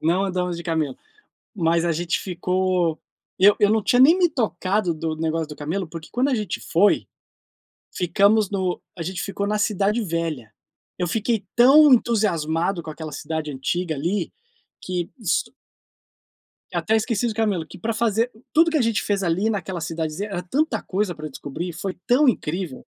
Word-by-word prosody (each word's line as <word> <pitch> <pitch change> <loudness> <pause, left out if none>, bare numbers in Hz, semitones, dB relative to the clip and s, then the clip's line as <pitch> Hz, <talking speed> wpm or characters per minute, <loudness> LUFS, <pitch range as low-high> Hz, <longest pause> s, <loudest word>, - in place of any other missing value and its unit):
não 175 +5 +2
andamos 180 -2 -2
de 170 - -7
camelo. 160 -5 -1 0.6
Mas 170 -1 +2
a 170 - +2
gente 170 +2 -1
ficou 180 -2 0 0.4
eu 200 +2 +7
eu 205 - +5
não 220 0 +3
tinha 245 +4 +3
nem 325 +7 +7
me 360 - +4
tocado 205 - 0
do 160 0 -3
negócio 160 0 -1
do 150 - -9
Camelo, 165 +5 -3
porque 160 -1 -9
quando 250 +3 +1
a 260 - +2
gente 210 -5 -3
foi, 195 +5 +2 0.9
ficamos 200 +4 +3
no 190 -3 -1 0.2
a 170 - -4
gente 180 +2 -4
ficou 200 0 -3
na 210 +1 0
cidade 210 +2 +1
velha. 165 - -3 0.5
Eu 180 -2 -1
fiquei 225 +1 0
tão 275 +5 +7
entusiasmado 180 -7 +1
com 155 - -7
aquela 155 0 -7
cidade 155 0 -4
antiga 160 +5 -2
ali, 175 +6 -2 0.5
que 180 -2 -3
s 220 - +1 1.3
até 220 - +1
esqueci 225 +1 0
do 220 - -4
camelo. 205 -7 0
Que - - -12
pra 225 +5 -2
fazer 230 +1 +1 0.2
tudo 330 +2 +5
que 320 - 0
a 280 - +3
gente 225 -3 +1
fez 200 -1 -1
ali, 185 +6 +1
naquela 190 -4 -3
cidadezinha, 165 +4 -3
era 180 -3 -3
tanta 255 - -1
coisa 190 -2 -1
pra 155 0 -7
descobrir, 145 +5 -6
e - - -5
foi 190 +3 -5
tão 265 +3 +4
incrível. 175 - -2
185 Hz, 175 wpm, -23 LUFS, 165-215 Hz, 1.3 s, eu